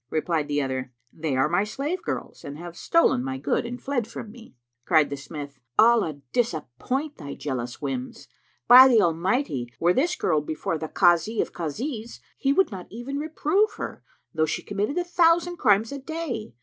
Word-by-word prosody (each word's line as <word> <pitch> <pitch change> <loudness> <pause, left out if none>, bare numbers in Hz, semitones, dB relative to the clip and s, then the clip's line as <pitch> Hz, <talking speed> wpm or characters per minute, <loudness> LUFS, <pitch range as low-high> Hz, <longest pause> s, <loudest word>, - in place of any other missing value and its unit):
Replied 155 -1 -1
the 145 -1 0
other, 130 -1 -3 0.2
"They 155 -4 -2
are 135 +2 +3
my 175 +5 +2
slave 285 - -3
girls, - - -5
and 140 +1 -7
have 175 +1 -9
stolen 335 - +2
my 130 0 -3
good 145 - -1
and 245 +1 -6
fled 250 -5 -2
from 210 - -8
me." 230 - -15 0.3
Cried 155 0 +3
the - - -1
smith, 140 -1 -8 0.2
"Allah 220 -11 +4
disappoint 245 - -2
thy 145 -4 -7
jealous 125 -2 -5
whims! 130 -2 -5 0.4
By 255 +2 +10
the 240 -4 +5
Almighty, 170 - 0
were 175 +2 +3
this 340 - +1
girl 155 -3 +1
before 155 +1 -3
the 160 - -4
Kazi 175 +6 +3
of - - -1
Kazis,[FN#359] 220 - -5 0.2
he 270 - +2
would 380 +2 +3
not 185 -3 -7
even 245 +6 -5
reprove 320 +7 +1
her, - - -6 0.3
though 155 -1 +1
she - - -3
committed 205 - -2
a 355 - +1
thousand 345 0 +2
crimes 215 -3 +3
a 280 - -5
day. 265 - -5
200 Hz, 180 wpm, -25 LUFS, -, 0.4 s, By